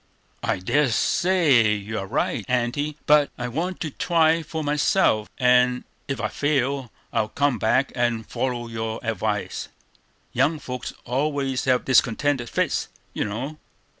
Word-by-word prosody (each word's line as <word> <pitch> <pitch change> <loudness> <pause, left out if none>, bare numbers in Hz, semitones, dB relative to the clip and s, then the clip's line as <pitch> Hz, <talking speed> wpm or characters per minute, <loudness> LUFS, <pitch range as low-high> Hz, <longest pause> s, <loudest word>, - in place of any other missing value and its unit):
"I - - 0
dare 130 +10 +1
say 135 - +3
you 105 +1 -4
are 95 - -5
right, 110 +1 -1
Aunty; 125 +5 0
but 150 -1 +5
I 125 - -3
want 170 +9 -3
to 155 - -3
try 165 +1 +2
for 160 0 -5
myself; 145 - +2
and 125 -1 +3 0.2
if 135 -1 -3
I - - 0
fail, 140 -3 -1 0.2
I'll 110 - +1
come 140 -1 +1
back 130 +6 +2
and 120 -3 0
follow 125 -2 -2
your 110 -1 -4
advice. 110 -2 -2 0.7
Young 155 +2 +2
folks 125 -3 -6
always 135 0 -1
have 130 -2 +2
discontented 130 0 +2
fits, - - 0 0.3
you - - -1
know. 130 +9 -5
130 Hz, 140 wpm, -24 LUFS, 115-145 Hz, 0.7 s, but